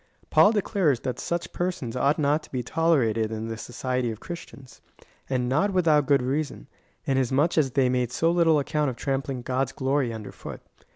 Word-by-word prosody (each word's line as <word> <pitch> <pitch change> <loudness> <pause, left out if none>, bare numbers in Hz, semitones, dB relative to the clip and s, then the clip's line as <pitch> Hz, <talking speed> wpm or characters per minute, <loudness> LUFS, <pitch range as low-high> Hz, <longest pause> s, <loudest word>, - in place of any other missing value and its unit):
Paul 205 - +6
declares 190 - +1
that 130 -2 -3
such 170 0 -3
persons 175 -10 -3
ought 140 +4 +2
not 150 0 +2
to - - -17
be 125 -2 -2
tolerated 120 -8 +1
in 110 0 -4
the 115 - -3
society 125 +2 -2
of 110 -1 -6
Christians; 140 -6 -10 0.5
and 125 -2 0
not 160 +11 +1
without 155 -6 +3
good 140 -2 +3
reason, 145 +4 -2 0.4
inasmuch 135 +4 +1
as 150 -4 +3
they 130 0 +2
made 125 -1 0
so 165 +5 +2
little 165 -2 +4
account 150 0 0
of 125 - -5
trampling 135 0 -3
God's 130 +2 -1
glory 135 -2 0
under 110 -2 -7
foot. - - -9
135 Hz, 180 wpm, -26 LUFS, 125-155 Hz, 0.5 s, Paul